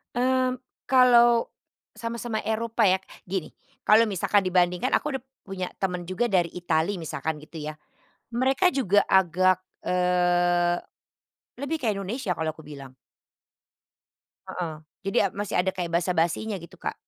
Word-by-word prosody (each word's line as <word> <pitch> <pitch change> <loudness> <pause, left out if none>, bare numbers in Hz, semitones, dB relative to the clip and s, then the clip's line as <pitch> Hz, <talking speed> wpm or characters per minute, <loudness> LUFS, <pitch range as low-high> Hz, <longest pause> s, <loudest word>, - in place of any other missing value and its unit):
Mmm, 255 +1 +2 0.3
kalau 240 -2 +5 0.4
sama-sama 230 -1 -4
Eropa 225 0 0
ya. 185 +1 +3 0.3
Gini, 185 -2 -3 0.3
kalau 220 +2 +5
misalkan 200 0 +1
dibandingkan 180 -1 +2
aku 290 -3 -1
udah - - -31 0.2
punya 190 -2 -4
temen 180 -2 -3
juga 200 +5 -1
dari 175 -3 +3
Italy 175 +2 0
misalkan 160 -2 -3
gitu 160 +1 -10
ya. 155 - -5 0.6
Mereka 265 +8 +2
juga 205 -7 +3
agak, 185 0 +3 0.2
eee, 175 -1 +2 0.8
lebih 280 +4 -2
kayak 215 -4 0
Indonesia 200 +2 -4
kalau 160 -2 -3
aku 160 - -13
bilang. 140 -3 -11 1.5
Heeh, 170 -3 -4 0.3
jadi - - -1
ab - - -20
masih 205 -1 -2
ada 190 +1 +1
kayak 175 -2 -3
basa-basinya 175 +4 0
gitu 170 - -13
Kak. - - -4
185 Hz, 135 wpm, -26 LUFS, 175-230 Hz, 1.5 s, kalau